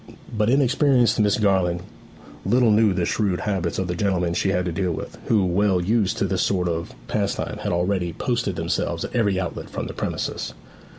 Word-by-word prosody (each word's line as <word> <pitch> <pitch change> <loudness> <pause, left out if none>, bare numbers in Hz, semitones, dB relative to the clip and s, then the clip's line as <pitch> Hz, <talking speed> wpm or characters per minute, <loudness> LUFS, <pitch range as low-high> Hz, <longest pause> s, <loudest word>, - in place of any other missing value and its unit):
But 105 +1 +2
inexperienced 130 -3 +3
Miss 105 -1 +3
Garland 95 -4 +1 0.6
little 120 -2 +3
knew 105 0 +4
the 90 -2 0
shrewd 100 -3 0
habits 95 -5 -1
of 95 - -1
the 90 - -1
gentlemen 90 -2 0
she 95 - 0
had 90 -2 +1
to 90 - -1
deal 90 +1 -1
with, 80 - -6
who, 105 -4 +3
well 95 +1 +2
used 105 +3 +1
to 100 - +1
this 95 -2 0
sort 90 -3 +1
of 85 0 -3
pastime, - - -2
had - - -2
already 90 0 0
posted 115 +2 -1
themselves - - -1
at - - -8
every 100 -5 +2
outlet 90 -3 -5
from - - -4
the - - -6
premises. - - -3
95 Hz, 190 wpm, -23 LUFS, 90-110 Hz, 0.6 s, knew